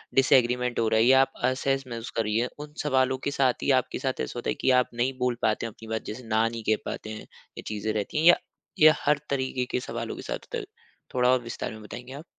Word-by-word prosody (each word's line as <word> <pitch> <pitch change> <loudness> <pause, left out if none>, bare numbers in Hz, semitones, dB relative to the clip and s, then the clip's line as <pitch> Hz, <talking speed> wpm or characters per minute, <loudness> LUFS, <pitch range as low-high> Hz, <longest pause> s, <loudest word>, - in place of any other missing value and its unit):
Disagreement 125 -2 +3
हो 115 - +2
रहा 110 - +3
है 115 - +5
या 130 +1 +7
आप 135 - +1
असहज 135 +1 +1
महसूस 115 -1 -6
कर 115 - +1
रही 105 +1 0
है 120 +2 +1
उन 150 0 -8
सवालों 130 -2 +2
के - - 0
साथ 130 -3 +1
ही 140 - +3
आपके 130 - -5
साथ 130 0 -2
ऐसा - - -4
होता 120 - -3
है - - +2
की - - +3
आप - - -5
नहीं 130 +2 -1
बोल 125 -1 +1
पाते - - +1
अपनी 110 0 -9
बात 110 0 -3
जैसे 125 +3 -8
ना 110 +1 +2
नहीं 115 -1 -5
कह 110 - +4
पाते 110 - -5
हैं, 110 - -6 0.4
ये - - -5
चीज़े 110 0 -2
रहती 105 +7 -3
है 155 - +1
या 175 - +8 0.4
या 155 0 +8
हर 150 0 +3
तरीके 130 -2 -1
के - - +1
सवालों - - -5
के - - -8
साथ - - -4 0.2
होता, 455 - -2 0.5
थोड़ा 125 0 +3
और 130 -1 +4
विस्तार 115 - -5
में 110 0 -10
बताएँगे 125 +4 -9
आप। 145 +4 -8
125 Hz, 255 wpm, -27 LUFS, 115-135 Hz, 0.5 s, या